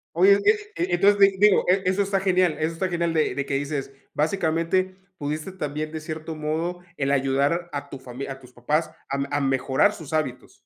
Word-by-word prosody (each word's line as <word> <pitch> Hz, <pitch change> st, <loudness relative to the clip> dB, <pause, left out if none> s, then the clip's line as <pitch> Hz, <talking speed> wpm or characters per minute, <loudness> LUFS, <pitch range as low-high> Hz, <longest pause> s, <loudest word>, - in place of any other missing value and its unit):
Oye, 200 Hz, +3 st, +6 dB, 0.4 s
e -, -, -1 dB
e 345 Hz, -, -1 dB
entonces, 200 Hz, +3 st, +4 dB
di 195 Hz, -1 st, +5 dB
digo, 205 Hz, 0 st, +5 dB
e 190 Hz, +1 st, +3 dB
eso 190 Hz, +2 st, +2 dB
está 195 Hz, -1 st, +1 dB
genial 185 Hz, -3 st, +2 dB
eso 160 Hz, +1 st, 0 dB
está 185 Hz, +3 st, -1 dB
genial, 170 Hz, -1 st, -1 dB
de 155 Hz, -1 st, +1 dB
de 140 Hz, -1 st, -2 dB
que 140 Hz, -, -4 dB
dices, 140 Hz, -1 st, -3 dB, 0.2 s
básicamente, 170 Hz, +3 st, 0 dB, 0.2 s
pudiste 150 Hz, +5 st, -4 dB
también, 155 Hz, -3 st, -4 dB
de 160 Hz, -, -5 dB
cierto 155 Hz, 0 st, -6 dB
modo, 160 Hz, +4 st, -2 dB, 0.2 s
el 135 Hz, 0 st, 0 dB
ayudar 140 Hz, +5 st, +1 dB
a 145 Hz, 0 st, -5 dB
tu 135 Hz, -, -8 dB
famili 130 Hz, +1 st, -7 dB
a 135 Hz, -, -6 dB
tus 125 Hz, -1 st, -17 dB
papás 150 Hz, +7 st, 0 dB, 0.2 s
a 140 Hz, -, -1 dB, 0.2 s
a -, -, 0 dB
mejorar 135 Hz, +8 st, +2 dB
sus 160 Hz, -4 st, -9 dB
hábitos. 150 Hz, -5 st, -2 dB
160 Hz, 205 wpm, -24 LUFS, 140-185 Hz, 0.4 s, Oye